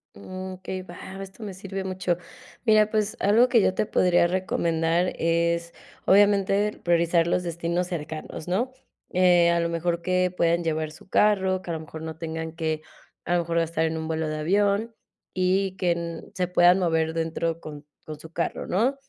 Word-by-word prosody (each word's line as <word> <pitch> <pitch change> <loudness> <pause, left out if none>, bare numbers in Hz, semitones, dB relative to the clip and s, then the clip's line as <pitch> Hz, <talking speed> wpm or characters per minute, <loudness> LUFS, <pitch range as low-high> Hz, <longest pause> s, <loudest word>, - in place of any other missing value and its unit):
Mm, 185 - -7
okey, 185 0 -6
va, - - -11 0.2
esto 195 +3 -10
me 200 - -5
sirve 195 +1 -6
mucho. 185 -2 -1 0.5
Mira, 215 -2 +5
pues, 215 -1 -1
algo 225 +5 +4
que 230 -4 +5
yo 185 - +2
te 190 - 0
podría 175 -3 +3
recomendar, 170 -1 0
es 170 0 0 0.3
obviamente 200 +1 +3
priorizar 170 -1 +3
los 180 +1 +1
destinos 170 +1 -2
cercanos, 155 -2 -6
¿no?, 220 +9 0 0.4
eh, 175 -2 +5
a 170 - +2
lo 170 - 0
mejor 170 0 -1
que 185 0 +1
puedan 170 0 +2
llevar 155 -1 -1
su 155 - -16
carro, 190 -3 +3
que 180 - -10
a - - -1
lo - - -4
mejor 160 0 -9
no 160 -1 -6
tengan 160 -1 -4
que, 160 -2 -2 0.4
a 175 - -1
lo 175 - +3
mejor 170 0 0
gastar 165 -1 0
en 160 0 -1
un 160 0 -4
vuelo 160 0 -1
de 155 0 -3
avión 200 +7 +1 0.4
y 190 +1 +1
que 170 -2 -1
se 185 -3 -1
puedan 180 +1 +5
mover 160 -3 +1
dentro 165 0 -2
con 150 -2 -9 0.2
con 155 -1 -8
su 160 +1 -12
carro, 170 - -3
¿no?, 240 +9 +1
175 Hz, 180 wpm, -25 LUFS, 165-190 Hz, 0.5 s, Mira